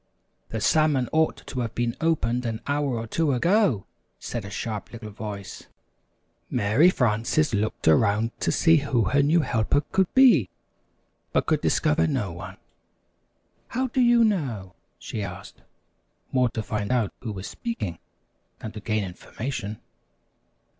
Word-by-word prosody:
"The 110 Hz, -, -3 dB
salmon 145 Hz, 0 st, +2 dB
ought 160 Hz, 0 st, +1 dB
to 130 Hz, -, -5 dB
have 115 Hz, -2 st, -3 dB
been 120 Hz, -1 st, -1 dB
opened 125 Hz, -7 st, +1 dB
an 115 Hz, 0 st, -4 dB
hour 145 Hz, -3 st, 0 dB
or 115 Hz, -, -4 dB
two 150 Hz, +5 st, 0 dB
ago," 170 Hz, -, +2 dB, 0.3 s
said -, -, -5 dB
a -, -, -7 dB
sharp 105 Hz, 0 st, -5 dB
little 110 Hz, -2 st, -8 dB
voice. 100 Hz, -2 st, -7 dB, 0.8 s
Mary 120 Hz, -, +4 dB
Frances 125 Hz, -, +1 dB
looked 105 Hz, -3 st, -1 dB
around 100 Hz, +8 st, +3 dB
to -, -, 0 dB
see 165 Hz, -1 st, +4 dB
who 135 Hz, -5 st, +1 dB
her 145 Hz, -, +3 dB
new 155 Hz, +4 st, +3 dB
helper 130 Hz, +1 st, +1 dB
could 190 Hz, -2 st, +2 dB
be, 235 Hz, -, +6 dB, 0.8 s
but -, -, +2 dB
could -, -, +1 dB
discover 80 Hz, +2 st, +2 dB
no 95 Hz, +3 st, -1 dB
one. 90 Hz, +2 st, -9 dB, 1.1 s
"How 255 Hz, +2 st, -2 dB
do 255 Hz, -, +1 dB
you 240 Hz, -1 st, +5 dB
know?" 130 Hz, -, -1 dB, 0.2 s
she 110 Hz, -, -5 dB
asked, 90 Hz, -3 st, -8 dB, 0.7 s
more 125 Hz, -2 st, +3 dB
to 115 Hz, -1 st, -4 dB
find 105 Hz, 0 st, -3 dB
out 120 Hz, -6 st, +1 dB
who 115 Hz, -, -5 dB
was 95 Hz, -2 st, -6 dB
speaking 105 Hz, -, -5 dB, 0.6 s
than 110 Hz, -, -7 dB
to 110 Hz, -, -8 dB
gain 110 Hz, 0 st, -1 dB
information. 105 Hz, +3 st, -6 dB
115 Hz, 145 wpm, -25 LUFS, 105-150 Hz, 1.1 s, be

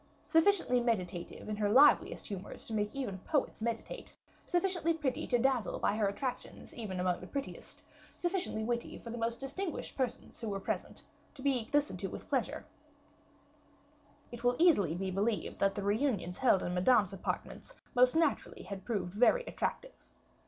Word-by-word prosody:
Sufficiently 325 Hz, -6 st, +4 dB
meditative 185 Hz, -8 st, -2 dB
in 215 Hz, -, -2 dB
her 210 Hz, -1 st, +1 dB
liveliest 275 Hz, +7 st, +5 dB
humors 195 Hz, -1 st, -6 dB
to 225 Hz, -, -6 dB
make 210 Hz, +1 st, -1 dB
even 225 Hz, -9 st, -3 dB
poets 285 Hz, -, -1 dB
meditate; 230 Hz, 0 st, -4 dB, 0.3 s
sufficiently 350 Hz, -2 st, +1 dB
pretty 290 Hz, -5 st, -2 dB
to 245 Hz, -, +3 dB
dazzle 255 Hz, -2 st, +1 dB
by 200 Hz, -, +1 dB
her 215 Hz, -2 st, +2 dB
attractions, 245 Hz, +6 st, -5 dB
even 200 Hz, -6 st, -4 dB
among 180 Hz, -1 st, 0 dB
the 180 Hz, -, -8 dB
prettiest; 280 Hz, +4 st, -6 dB, 0.3 s
sufficiently 350 Hz, -, -1 dB
witty 235 Hz, +1 st, -2 dB
for 230 Hz, -, -8 dB
the 240 Hz, -, -5 dB
most 230 Hz, 0 st, -1 dB
distinguished 305 Hz, +6 st, -4 dB
persons 260 Hz, -3 st, -3 dB
who 230 Hz, -2 st, -4 dB
were 200 Hz, -1 st, -2 dB
present, -, -, -4 dB, 0.3 s
to 265 Hz, -, -10 dB
be 260 Hz, -5 st, +1 dB
listened 290 Hz, 0 st, +1 dB
to -, -, -2 dB
with -, -, -8 dB
pleasure -, -, -1 dB, 1.7 s
it 240 Hz, 0 st, -8 dB
will 245 Hz, 0 st, +3 dB
easily 205 Hz, -, +4 dB
be 190 Hz, +1 st, -2 dB
believed 205 Hz, +3 st, -1 dB
that 195 Hz, 0 st, +2 dB
the 205 Hz, -, -3 dB
reunions 205 Hz, -4 st, 0 dB
held 245 Hz, -7 st, +4 dB
in 175 Hz, -, -2 dB
Madame's 200 Hz, +1 st, +4 dB
apartments 345 Hz, -, -5 dB, 0.2 s
must 250 Hz, 0 st, +5 dB
naturally 320 Hz, -3 st, +1 dB
have 195 Hz, 0 st, -7 dB
proved 190 Hz, -5 st, -2 dB
very 250 Hz, -, +4 dB
attractive. -, -, -4 dB
235 Hz, 165 wpm, -33 LUFS, 200-280 Hz, 1.7 s, liveliest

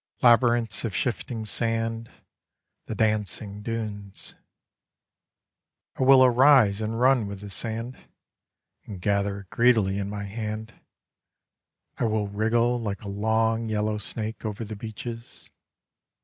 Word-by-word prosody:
Labyrinths 120 Hz, -1 st, +4 dB
of 110 Hz, -5 st, -3 dB
shifting 120 Hz, -2 st, -2 dB
sand, 115 Hz, +1 st, -2 dB, 0.8 s
The -, -, -4 dB
dancing 105 Hz, -1 st, -1 dB
dunes! 105 Hz, -3 st, -5 dB, 1.6 s
I -, -, -6 dB
will 130 Hz, 0 st, +7 dB
arise 125 Hz, -5 st, +5 dB
and 110 Hz, +1 st, -2 dB
run 125 Hz, -3 st, +4 dB
with 100 Hz, -1 st, -7 dB
the 100 Hz, -1 st, -8 dB
sand, 115 Hz, +5 st, -4 dB, 0.9 s
And 100 Hz, -3 st, -8 dB
gather 100 Hz, +1 st, 0 dB
it 95 Hz, -, -19 dB
greedily 110 Hz, -5 st, +3 dB
in 100 Hz, 0 st, -3 dB
my 100 Hz, 0 st, -5 dB
hand: 110 Hz, +2 st, -5 dB, 1.3 s
I -, -, +1 dB
will 110 Hz, -2 st, 0 dB
wriggle 115 Hz, +4 st, +1 dB
like 105 Hz, -2 st, -4 dB
a -, -, -7 dB
long 110 Hz, +2 st, 0 dB
yellow 105 Hz, 0 st, -1 dB
snake 110 Hz, +1 st, -5 dB
over 110 Hz, +1 st, -4 dB
the 110 Hz, +1 st, -6 dB
beaches. 115 Hz, +2 st, -8 dB
110 Hz, 120 wpm, -26 LUFS, 105-115 Hz, 1.6 s, will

